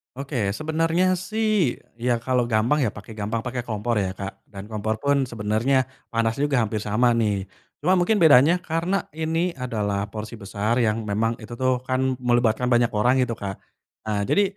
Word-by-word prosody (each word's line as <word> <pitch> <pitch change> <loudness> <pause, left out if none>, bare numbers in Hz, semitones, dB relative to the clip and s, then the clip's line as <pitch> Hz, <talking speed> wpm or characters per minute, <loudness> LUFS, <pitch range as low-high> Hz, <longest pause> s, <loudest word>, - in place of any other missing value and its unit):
Oke 125 -7 -2
sebenernya 165 +3 +1
sih 215 - +1 0.2
ya 120 0 +1
kalo 125 -2 +1
gampang 120 +6 +2
ya 125 - +2
pake 105 +2 -10
gampang 110 +2 -2
pake 125 0 -4
kompor 110 0 -1
ya 95 -1 -2
Kak 100 0 -7
dan 95 -1 -9
kompor 110 +1 -1
pun 140 -2 +2
sebenernya 115 +4 +1 0.2
panasnya 115 +5 0
juga 135 -5 +2
hampir 110 0 -2
sama 115 +4 +2
nih, 105 -4 +1 0.4
cuma 180 +4 +4
mungkin 180 +5 +2
bedanya 155 +1 +7
karena 170 +4 -1
ini 160 +3 -1
adalah 105 -6 -2
porsi 105 +2 -7
besar 105 +4 -1
yang 110 0 +1
memang 110 +3 0
itu 115 +2 -8
tuh 130 -1 +1
kan 130 0 0
melibatkan 120 0 +2
banyak 120 -1 +4
orang 125 +5 +3
gitu 120 -2 0
Kak, 100 -3 -6 0.5
eee, 105 -1 0
jadi, 205 - +4
120 Hz, 175 wpm, -24 LUFS, 110-140 Hz, 0.5 s, bedanya